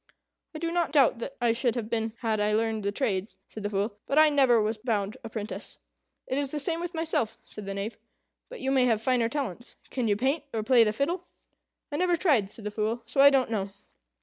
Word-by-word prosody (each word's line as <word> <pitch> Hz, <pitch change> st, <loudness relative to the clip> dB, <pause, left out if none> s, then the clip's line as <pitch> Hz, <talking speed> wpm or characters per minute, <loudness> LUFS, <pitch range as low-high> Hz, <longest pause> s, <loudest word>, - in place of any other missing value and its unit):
"I -, -, -3 dB
do 335 Hz, +1 st, -2 dB
not 345 Hz, -3 st, 0 dB
doubt 280 Hz, -5 st, +4 dB
that 270 Hz, +3 st, -6 dB
I 240 Hz, -2 st, +3 dB
should 235 Hz, +1 st, 0 dB
have 230 Hz, -3 st, -3 dB
been 225 Hz, -1 st, -2 dB
had 220 Hz, -3 st, 0 dB
I 210 Hz, 0 st, +1 dB
learned 220 Hz, 0 st, 0 dB
the 200 Hz, -, 0 dB
trades," 205 Hz, -3 st, -2 dB
said 215 Hz, -, -9 dB
the 205 Hz, -, -2 dB
Fool, 205 Hz, +1 st, -2 dB
"but 275 Hz, -, 0 dB
I 310 Hz, 0 st, +7 dB
never 265 Hz, -5 st, +4 dB
was 215 Hz, +1 st, -1 dB
bound 215 Hz, -2 st, -1 dB
apprentice." 220 Hz, -1 st, -6 dB, 0.5 s
"It 265 Hz, -, -1 dB
is 280 Hz, -1 st, -1 dB
the 300 Hz, -, -3 dB
same 325 Hz, +3 st, +1 dB
with 350 Hz, 0 st, -5 dB
myself," 315 Hz, -9 st, 0 dB
said 210 Hz, -2 st, -9 dB
the 195 Hz, -, -3 dB
Knave; 200 Hz, +4 st, -4 dB, 0.5 s
"but -, -, -9 dB
you 265 Hz, -, 0 dB
may 260 Hz, -2 st, +4 dB
have 225 Hz, -3 st, +2 dB
finer 235 Hz, 0 st, +1 dB
talents. 240 Hz, -4 st, -4 dB, 0.2 s
Can 250 Hz, -3 st, -1 dB
you 205 Hz, -, +3 dB
paint, 270 Hz, +7 st, 0 dB
or 220 Hz, -, -1 dB
play 240 Hz, +1 st, +6 dB
the 210 Hz, -, +1 dB
fiddle?" 280 Hz, -, -2 dB, 0.6 s
"I 290 Hz, -, -2 dB
never 355 Hz, +1 st, +2 dB
tried," 285 Hz, -, +2 dB
said 215 Hz, 0 st, -8 dB
the 210 Hz, -, -2 dB
Fool; 220 Hz, +2 st, -2 dB
"so 275 Hz, -, +1 dB
I 280 Hz, -, +10 dB
don't 265 Hz, -4 st, +2 dB
know." 200 Hz, -3 st, -2 dB
235 Hz, 230 wpm, -28 LUFS, 215-280 Hz, 0.6 s, I